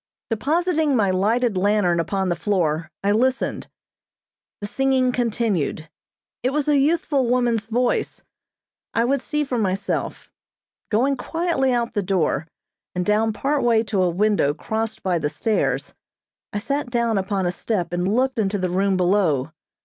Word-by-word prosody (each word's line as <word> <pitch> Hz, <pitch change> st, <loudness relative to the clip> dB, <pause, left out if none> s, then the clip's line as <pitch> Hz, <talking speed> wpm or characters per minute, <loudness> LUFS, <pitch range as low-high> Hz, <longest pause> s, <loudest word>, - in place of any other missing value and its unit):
Depositing 310 Hz, +4 st, +1 dB
my 205 Hz, -5 st, +2 dB
lighted 220 Hz, +4 st, +1 dB
lantern 185 Hz, -2 st, +2 dB
upon 190 Hz, +3 st, -1 dB
the 175 Hz, -, +1 dB
floor, 165 Hz, -5 st, 0 dB
I 200 Hz, -, +2 dB
listened. 255 Hz, +5 st, 0 dB, 0.9 s
The 205 Hz, -, -5 dB
singing 260 Hz, +3 st, +1 dB
continued. 215 Hz, -, -1 dB, 0.5 s
It 250 Hz, -, +1 dB
was 295 Hz, 0 st, 0 dB
a 290 Hz, -2 st, +4 dB
youthful 295 Hz, -3 st, +1 dB
woman's 240 Hz, -3 st, +1 dB
voice. 240 Hz, +2 st, -1 dB, 0.7 s
I 230 Hz, -, +3 dB
would 275 Hz, +1 st, +1 dB
see 300 Hz, +1 st, -1 dB
for 255 Hz, -4 st, -2 dB
myself. 195 Hz, -1 st, -2 dB, 0.6 s
Going 260 Hz, +6 st, +2 dB
quietly 325 Hz, -3 st, 0 dB
out 235 Hz, -1 st, 0 dB
the 205 Hz, -, 0 dB
door, 175 Hz, -5 st, 0 dB, 0.5 s
and 180 Hz, 0 st, -1 dB
down 215 Hz, +2 st, +2 dB
part 275 Hz, +7 st, 0 dB
way 230 Hz, -2 st, +3 dB
to 200 Hz, -3 st, -1 dB
a 180 Hz, -, +3 dB
window 185 Hz, -5 st, +1 dB
crossed 220 Hz, +4 st, -3 dB
by 180 Hz, -3 st, +1 dB
the 150 Hz, -, -1 dB
stairs, 145 Hz, -, -1 dB, 0.6 s
I -, -, -3 dB
sat 275 Hz, +5 st, -2 dB
down 235 Hz, -3 st, +1 dB
upon 190 Hz, 0 st, -1 dB
a 175 Hz, -, +1 dB
step 180 Hz, -3 st, -2 dB
and 180 Hz, +2 st, 0 dB
looked 260 Hz, +2 st, +1 dB
into 205 Hz, -1 st, 0 dB
the 185 Hz, -2 st, -2 dB
room 190 Hz, +1 st, +1 dB
below. 175 Hz, -7 st, +2 dB
215 Hz, 155 wpm, -22 LUFS, 185-250 Hz, 0.9 s, a